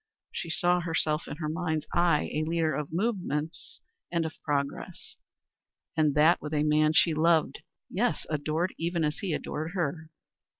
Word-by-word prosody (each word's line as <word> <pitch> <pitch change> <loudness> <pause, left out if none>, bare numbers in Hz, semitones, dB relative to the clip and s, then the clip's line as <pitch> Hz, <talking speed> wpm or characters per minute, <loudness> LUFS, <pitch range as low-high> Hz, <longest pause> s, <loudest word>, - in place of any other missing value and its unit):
She 170 - -5
saw 175 +2 +2
herself 160 -2 -1
in - - -6
her 155 -1 -3
mind's 160 -1 -1
eye 170 -3 +2
a 155 - 0
leader 160 0 +1
of 150 -1 -3
movements 175 -5 -2 0.3
and 170 -2 +1
of 160 - -4
progress. 140 -2 -3 0.8
And 155 -3 +2
that 155 +4 +5
with 150 0 -4
a 150 - +2
man 155 0 +3
she 160 +1 +4
loved 160 +1 +2 0.3
yes, - - 0
adored 155 +4 -1
even 170 0 0
as 150 0 -1
he 195 - -2
adored 155 +2 -3
her. 160 -2 -2
160 Hz, 160 wpm, -28 LUFS, 150-170 Hz, 0.8 s, that